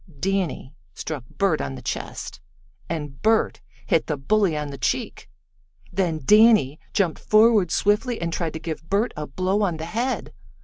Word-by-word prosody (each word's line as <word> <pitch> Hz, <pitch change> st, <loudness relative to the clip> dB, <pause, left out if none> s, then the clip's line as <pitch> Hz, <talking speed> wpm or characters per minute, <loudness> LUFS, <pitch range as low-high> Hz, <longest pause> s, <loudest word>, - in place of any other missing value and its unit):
Danny 185 Hz, -7 st, -1 dB, 0.2 s
struck 150 Hz, -6 st, -5 dB
Bert 195 Hz, -6 st, +1 dB
on 70 Hz, -1 st, -4 dB
the -, -, -9 dB
chest, -, -, -5 dB, 0.5 s
and 145 Hz, -4 st, -5 dB
Bert 220 Hz, 0 st, +2 dB, 0.2 s
hit 165 Hz, -5 st, +1 dB
the 150 Hz, -, -1 dB
bully 185 Hz, +3 st, +1 dB
on 150 Hz, -1 st, -4 dB
the 140 Hz, -, -7 dB
cheek. -, -, -2 dB, 0.6 s
Then 170 Hz, -4 st, 0 dB
Danny 210 Hz, -, +5 dB
jumped 185 Hz, -6 st, 0 dB
forward 215 Hz, -4 st, +4 dB
swiftly 210 Hz, +7 st, +1 dB
and 170 Hz, -1 st, -2 dB
tried 165 Hz, -2 st, -2 dB
to 160 Hz, -, -5 dB
give 160 Hz, 0 st, -6 dB
Bert 205 Hz, +5 st, +1 dB
a 150 Hz, 0 st, -5 dB
blow 185 Hz, +8 st, 0 dB
on 180 Hz, -6 st, 0 dB
the 160 Hz, -, -5 dB
head. 235 Hz, +9 st, -2 dB
175 Hz, 165 wpm, -24 LUFS, 155-210 Hz, 0.6 s, Danny